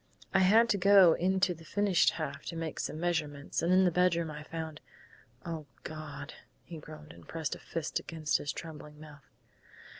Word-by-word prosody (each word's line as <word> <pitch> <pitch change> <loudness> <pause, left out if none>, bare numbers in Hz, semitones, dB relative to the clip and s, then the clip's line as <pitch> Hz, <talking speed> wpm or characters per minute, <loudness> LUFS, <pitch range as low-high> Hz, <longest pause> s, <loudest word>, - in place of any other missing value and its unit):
I 195 - +5
had 215 +5 +6
to 200 - +2
go 195 -3 +7
into 190 +1 +1
the 165 -1 -14
finished 200 0 +2
half - - -5
to 170 - -4
make 165 -1 -4
some 155 - -3
measurements, 155 -4 -2
and 170 +2 +1
in 185 +1 +5
the 180 - +3
bedroom 170 -2 +2
I 150 0 -7
found 160 0 -6 0.6
oh, 160 -3 -5 0.2
God!" 150 -2 -7 0.3
he 165 -2 -9
groaned, 150 0 -11
and - - -16
pressed 160 -4 -3
a - - -8
fist 165 -2 -3
against 155 -3 -1
his 145 - -3
trembling 150 -2 -9
mouth. 150 -3 -14
165 Hz, 180 wpm, -31 LUFS, 150-180 Hz, 0.6 s, go